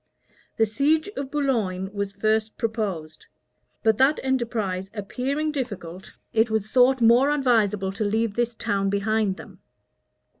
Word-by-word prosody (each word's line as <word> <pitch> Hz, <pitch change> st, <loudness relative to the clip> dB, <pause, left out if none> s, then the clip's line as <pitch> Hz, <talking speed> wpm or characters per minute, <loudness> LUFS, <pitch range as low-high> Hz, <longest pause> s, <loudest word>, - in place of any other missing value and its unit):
The 225 Hz, -, +4 dB
siege 290 Hz, -, +1 dB
of 275 Hz, -1 st, -4 dB
Boulogne 220 Hz, -10 st, -1 dB
was 200 Hz, -1 st, -3 dB
first 215 Hz, +2 st, 0 dB
proposed; 200 Hz, -9 st, -4 dB, 0.6 s
but 220 Hz, 0 st, +3 dB
that 270 Hz, +3 st, +4 dB
enterprise 225 Hz, -8 st, -1 dB
appearing 270 Hz, +9 st, -2 dB
difficult, 195 Hz, -, -6 dB, 0.2 s
it 225 Hz, +1 st, +3 dB
was 220 Hz, -1 st, -2 dB
thought 255 Hz, 0 st, +4 dB
more 240 Hz, +4 st, +5 dB
advisable 220 Hz, -9 st, +2 dB
to 200 Hz, +3 st, -3 dB
leave 220 Hz, +1 st, 0 dB
this 240 Hz, +1 st, -1 dB
town 195 Hz, -2 st, -1 dB
behind 200 Hz, 0 st, 0 dB
them. -, -, -12 dB
220 Hz, 135 wpm, -24 LUFS, 200-255 Hz, 0.6 s, more